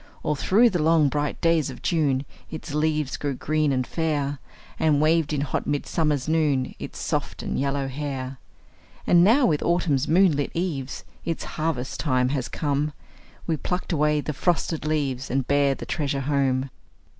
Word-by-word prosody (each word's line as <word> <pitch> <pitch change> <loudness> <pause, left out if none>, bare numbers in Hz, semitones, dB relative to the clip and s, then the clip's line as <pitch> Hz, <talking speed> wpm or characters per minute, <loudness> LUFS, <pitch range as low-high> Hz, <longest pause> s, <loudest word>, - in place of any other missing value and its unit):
All 150 - +1
through 215 +10 +4
the 175 - 0
long, 160 -2 +4
bright 145 +1 -2
days 165 -3 +2
of 130 - -10
June 145 -5 +1 0.2
Its 155 -1 -7
leaves 150 -2 0
grew 145 -2 -2
green 155 +2 0
and 130 -1 0
fair, 145 -3 -1 0.4
And 150 -2 +3
waved 155 0 +3
in 145 -2 0
hot 145 - -2
midsummer's 145 -1 0
noon 150 -5 +1
Its - - -7
soft - - -3
and - - -2
yellow 140 0 0
hair. 135 -1 -5 0.7
And 175 0 +6
now, 240 +8 +5
with 150 -7 +2
autumn's 160 -6 +1
moon 180 +3 +5
lit 145 0 -1
eves, 155 -7 -3 0.2
Its 165 -1 -3
harvest 155 -5 -3
time 130 -4 +1
has 135 -3 -1
come, 145 0 -1 0.5
We 160 -2 0
pluck 180 +5 -3
away 150 -2 +2
the 150 - -3
frosted 165 0 0
leaves, 135 -4 -1
And 130 -1 0
bear 140 -1 +3
the - - -8
treasure 140 -3 -1
home. 135 -1 0
150 Hz, 170 wpm, -25 LUFS, 135-160 Hz, 0.7 s, And